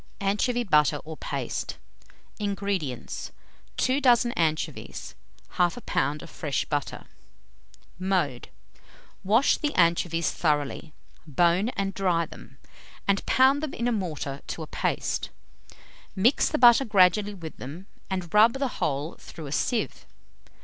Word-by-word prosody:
ANCHOVY 210 +5 +1
BUTTER 150 - +3
OR 160 0 -7
PASTE. - - -4 0.6
227. 205 -1 -1
INGREDIENTS. 195 - -3 0.5
2 260 +3 +1
dozen 245 -2 +4
anchovies, 160 -6 -2 0.4
1/2 180 +6 +1
lb. 150 -5 -1
of - - -9
fresh 145 -3 -2
butter. 145 -2 -3 0.9
Mode. 180 - -1 0.7
Wash 220 +8 +4
the 295 -2 0
anchovies 170 -1 +2
thoroughly; 150 -1 -1 0.3
bone 175 - +2
and 195 0 -1
dry 180 -4 +1
them, 135 -3 -14 0.5
and 200 0 +2
pound 265 +2 +4
them 310 -3 -4
in 235 - -1
a - - +2
mortar 155 -9 -3
to 165 - -5
a - - -6
paste. - - -2 0.9
Mix 230 +8 +3
the - - 0
butter 240 +1 +7
gradually 205 0 +3
with 165 -4 -9
them, 155 +9 -8 0.2
and 185 -3 -4
rub 220 +2 +6
the 275 0 -1
whole 145 +3 -2
through 160 - -10
a 140 - -7
sieve. 230 - -1
185 Hz, 130 wpm, -26 LUFS, 155-220 Hz, 0.9 s, butter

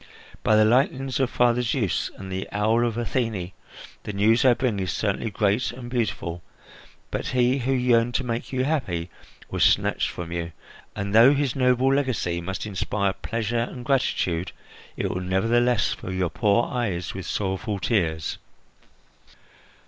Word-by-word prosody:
By 110 - +3
the 110 0 +5
lightnings 130 +2 +1
of 130 -2 +2
Father 120 -1 +2
Zeus 115 - 0
and 95 -1 -8
the 95 +1 -4
owl 110 +3 +2
of 115 -1 -3
Athene, 115 -6 -2 0.5
the - - -5
news 110 +4 +3
I 125 -2 +6
bring 115 -6 -1
is 95 -1 -1
certainly 110 +2 -1
great 105 +4 +1
and 120 0 -9
beautiful; 90 -8 -2 0.7
but - - -3
he 125 +1 +2
who 130 +2 -1
yearned 120 -2 +2
to 135 - +1
make 120 -1 -4
you 130 -1 0
happy 95 - -2 0.4
was - - +1
snatched - - +2
from 85 -1 -7
you 85 -1 -4 0.4
and, 100 0 -3
though 120 +6 +7
his 140 -3 0
noble 130 0 +3
legacy 120 -11 0
must 95 +4 -4
inspire 100 -1 -1
pleasure 115 +2 -2
and 125 -2 -9
gratitude, 95 -10 0 0.4
it - - -1
will 90 - -3
nevertheless 115 +5 +2
fill 95 - -7
your 95 -2 -1
poor 105 +1 +2
eyes 100 -9 -2
with 95 -1 -6
sorrowful 100 +1 -2
tears." 80 -5 -1
115 Hz, 155 wpm, -24 LUFS, 95-125 Hz, 0.7 s, though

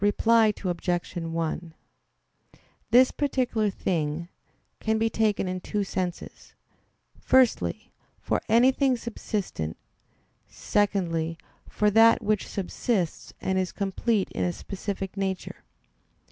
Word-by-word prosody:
Reply 220 +1 +4
Obj. 175 0 -1
1: 165 0 -3 1.2
"This 255 +3 +6
particular 250 -6 0
thing" 170 -3 -2 0.5
can 220 0 0
be 225 0 +1
taken 215 -3 +1
in 185 0 -3
two 205 +2 -2
senses. 180 -2 -5 0.6
Firstly, 240 - +2 0.3
for - - -1
anything 255 +3 +4
subsistent; 205 - -4 0.7
secondly, 170 -6 0 0.3
for 210 0 +2
that 225 +2 +6
which 210 -1 0
subsists, 195 -2 -2
and 190 0 0
is 185 -1 -1
complete 200 +1 -1
in - - -2
a 175 - +1
specific 195 0 -5
nature. 190 -2 -3
200 Hz, 105 wpm, -26 LUFS, 175-225 Hz, 1.2 s, This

